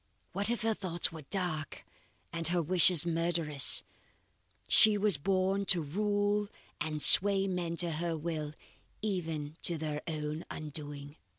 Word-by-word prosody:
What 200 +2 +2
if 235 -2 -3
her 225 0 0
thoughts 175 -5 -2
were 160 -1 -10
dark 160 -2 -5 0.5
and 165 -1 -1
her 175 +1 0
wishes 175 0 +3
murderous! 165 -4 0 0.8
She 215 -1 +5
was 200 -7 0
born 195 +3 -1
to 180 -3 +2
rule 205 +5 -2 0.3
and 155 0 -4
sway 195 +4 +8
men 175 -3 -4
to 170 0 -1
her 165 +1 -4
will 155 -2 -6 0.5
even 165 -7 -5
to 170 - +3
their 150 -1 -5
own 155 0 -5
undoing." 145 -1 -9
170 Hz, 135 wpm, -30 LUFS, 155-195 Hz, 0.8 s, sway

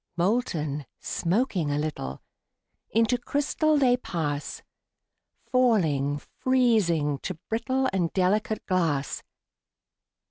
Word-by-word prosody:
Molten, 170 - 0
smoking 180 - 0
a 145 - 0
little, 150 - -4 0.7
Into 230 +2 +2
crystal 295 +4 +1
they 250 -3 +4
pass; 150 -10 -3 0.9
Falling, 160 - +2 0.2
freezing, 205 - +2
to 185 - -4
brittle 260 +4 0
And 175 -4 0
delicate 200 +3 +1
glass. 160 -7 0
185 Hz, 85 wpm, -26 LUFS, 150-245 Hz, 0.9 s, they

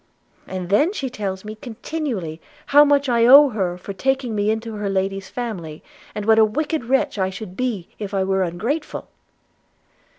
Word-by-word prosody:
And 185 -2 -5
then 290 - +3
she 270 -10 -4
tells 195 -4 -4
me 215 - -6
continually 220 - -5 0.2
how 290 +1 +7
much 285 -1 +3
I 235 -2 +3
owe 280 +3 +9
her 190 -6 -2
for 195 +2 -7
taking 265 +2 -1
me 205 0 0
into 220 +1 -2
her 205 -1 -2
lady's 195 0 -2
family, 180 -11 -6 0.3
and 210 - -4
what 220 0 +5
a - - +7
wicked 295 +5 -1
wretch 260 -4 +1
I 190 0 +1
should 190 -1 -8
be 220 -7 -2
if 205 -2 -5
I 195 -2 0
were 190 0 +1
ungrateful.' 215 - -3
215 Hz, 175 wpm, -21 LUFS, 190-255 Hz, 0.3 s, owe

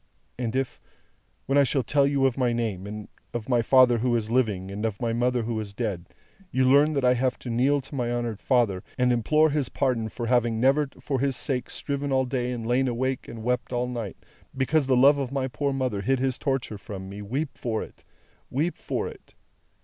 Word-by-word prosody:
And 120 -1 -2
if, 135 -1 -2 0.6
when 135 +2 +3
I - - +6
shall 135 0 +1
tell 140 +1 +3
you 140 -1 +2
of 130 -3 +2
my 125 -3 +1
name, 105 -5 -2
and 105 0 -7 0.3
of 115 -2 -3
my 120 -2 +3
father 125 -1 +5
who 120 +1 +1
is 110 -1 -2
living, 105 -7 0
and 100 +2 -5
of 110 -3 -2
my 115 -1 -1
mother 120 0 +1
who 115 -1 -2
is 100 -2 -6
dead, 100 -7 -3 0.4
you 130 -4 +2
learn 145 +4 +5
that 140 -3 0
I 125 - +6
have 125 +1 0
to 120 - -6
kneel 135 +5 +2
to 135 - -13
my 120 -3 -1
honoured 120 -3 -2
father, 115 -8 +2 0.2
and 125 -1 +3
implore 150 +7 +3
his 140 -3 0
pardon 125 -5 0
for 120 +2 -5
having 120 -2 +2
never 135 +3 +3
for 135 -3 -2
his 135 0 +1
sake 125 -2 -1
striven 140 0 -3
all 130 0 +2
day 125 -1 -2
and 120 -2 -4
lain 125 +3 +2
awake 130 +2 -2
and 115 -1 -8
wept 125 +1 -1
all 120 0 0
night, 115 -6 -5 0.4
because 140 +2 +2
the 130 -2 +3
love 140 +3 +6
of 135 -2 -3
my 135 -1 -1
poor 140 +2 -2
mother 130 -7 -1
hid 135 +6 +1
his 130 0 -1
torture 135 -7 -2
from 95 -2 -7
me, 100 +2 -8
weep 135 +7 -3
for 110 -3 -2
it, - - -14 0.5
weep 155 +7 -1
for - - -2
it! - - -13
125 Hz, 220 wpm, -26 LUFS, 115-135 Hz, 0.6 s, I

